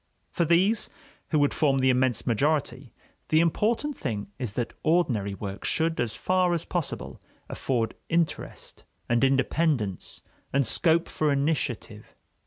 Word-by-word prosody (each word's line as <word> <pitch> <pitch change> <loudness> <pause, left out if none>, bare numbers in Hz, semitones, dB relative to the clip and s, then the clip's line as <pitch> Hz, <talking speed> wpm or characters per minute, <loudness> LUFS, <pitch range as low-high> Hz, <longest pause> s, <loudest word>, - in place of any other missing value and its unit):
For 170 - +1
these, 185 +7 +3 0.4
who 155 - +2
would 145 -1 +3
form 140 -4 +2
the 130 0 +4
immense 125 -3 +1
majority, 140 +1 0 0.4
the 155 - +4
important 220 - +1
thing 105 -7 -4
is 120 -6 -3
that 120 0 -3
ordinary 125 - +1
work 100 -1 -6
should, 165 0 0
as 115 -2 -1
far 180 +4 +1
as 165 - -3
possible, 175 -5 -4 0.3
afford 120 -4 -1 0.2
interest 165 -1 -2 0.2
and 120 +2 +2
independence 135 - 0 0.3
and 140 -1 +2
scope 165 +7 +3
for 155 -1 0
initiative. 140 -7 -2
140 Hz, 135 wpm, -26 LUFS, 120-165 Hz, 0.4 s, the